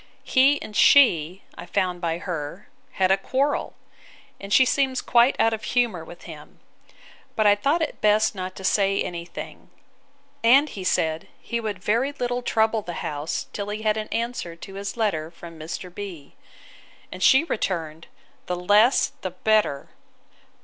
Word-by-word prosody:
He 275 +2 +3
and 210 - -10
she, 185 - +4
I - - -10
found 180 -3 -1
by 165 -1 -1
her, 170 -1 -6 0.2
had 190 -1 +2
a 190 - +4
quarrel: 270 +8 -1 0.6
and 200 0 -9
she 260 +5 +6
seems 265 0 +1
quite 240 +2 +3
out 225 - +3
of 220 -1 -5
humour 225 -7 0
with 170 +2 -13
him: - - -12 0.8
but 215 - +1
I 205 - +7
thought 285 +11 +1
it 305 - -5
best 215 +1 +3
not 185 -1 -6
to 190 - -10
say 195 0 +2
any 170 -1 -4
thing: - - -10 0.7
and 270 +6 +5
he 195 - -7
said, 160 -3 0
he 235 - -4
would 215 -3 -4
very 230 +9 0
little 245 -2 -2
trouble 220 -2 +1
the 175 -3 -7
house 150 +1 -3
till 205 0 -4
he 210 +1 -5
had 215 -1 +2
an 215 -1 -4
answer 230 -7 -4
to 195 +3 -11
his 200 +3 -6
letter 160 -9 -1
from 170 -1 -12
Mr. 175 +3 -7
B——. 185 -8 -8 0.8
And 185 - -8
she 265 +9 +6
returned, 165 - -3 0.4
The 180 - -1
less, 205 +8 +3
the 185 - -3
better. 185 -6 0
205 Hz, 165 wpm, -24 LUFS, 175-235 Hz, 0.8 s, I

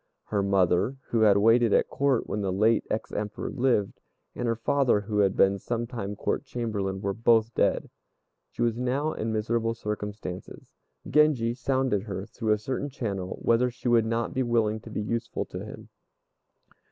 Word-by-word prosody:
Her 105 -2 +1
mother, 100 +5 +2
who 115 - +1
had 105 -2 +6
waited 115 +2 +4
at - - +3
Court 140 -3 +1
when 105 - -2
the 95 -2 -1
late 110 +4 +2
ex 110 - -3
Emperor 105 0 -4
lived, 120 -7 0 0.3
and 120 - -3
her 115 - +1
father, 120 -1 +2
who 105 0 -2
had 100 -2 +3
been 95 0 +3
some 120 +2 -2
time 110 -4 -5
Court - - -2
Chamberlain, 105 -7 -3
were 100 -1 -1
both 115 +1 +3
dead. - - +1 0.6
She - - -3
was 115 -1 +1
now 135 +5 0
in 110 +1 -3
miserable 115 +1 0
circumstances. 105 -4 -6 0.3
Genji 135 -6 +3
sounded 130 -3 0
her, 100 -2 -5
through 110 0 -2
a - - +1
certain 130 +6 -3
channel, 100 -8 -4
whether 120 +2 +3
she 125 +1 -7
would 115 -2 +4
not 115 0 -1
be 130 - 0
willing 115 -3 +1
to - - -12
be 105 - -3
useful 115 +2 -3
to - - -7
him. - - -10
115 Hz, 175 wpm, -27 LUFS, 105-120 Hz, 0.6 s, had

